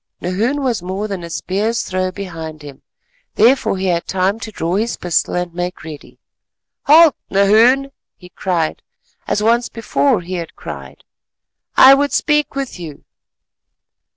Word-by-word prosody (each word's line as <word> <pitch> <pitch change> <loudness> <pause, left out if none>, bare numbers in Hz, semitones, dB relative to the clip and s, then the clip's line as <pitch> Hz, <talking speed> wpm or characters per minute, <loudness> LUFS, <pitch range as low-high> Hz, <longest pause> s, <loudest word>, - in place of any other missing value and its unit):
Nahoon 225 +11 -1
was 245 -7 -1
more 190 +4 -4
than 195 -4 -5
a 170 - -7
spear's 205 +7 -2
throw 185 0 -2
behind 165 -5 -8
him; 140 -2 -11 0.5
therefore 235 -3 +3
he 190 - -3
had 170 -2 0
time 190 +3 0
to 225 - -7
draw 170 -4 -3
his 220 +4 -1
pistol 175 -2 -1
and 180 -1 -3
make 175 +1 -5
ready. 155 -2 -11 0.7
"Halt, 315 0 +7
Nahoon," 230 +8 +4 0.3
he 180 - -15
cried, 170 -4 -2 0.5
as 210 - 0
once 235 +2 +2
before 230 0 0
he 175 +2 -8
had 170 -2 -5
cried; - - -9 0.7
"I 265 +1 +9
would 285 +1 +1
speak 300 -3 +1
with 275 -8 -4
you." 155 -5 -9
195 Hz, 150 wpm, -17 LUFS, 175-235 Hz, 0.7 s, I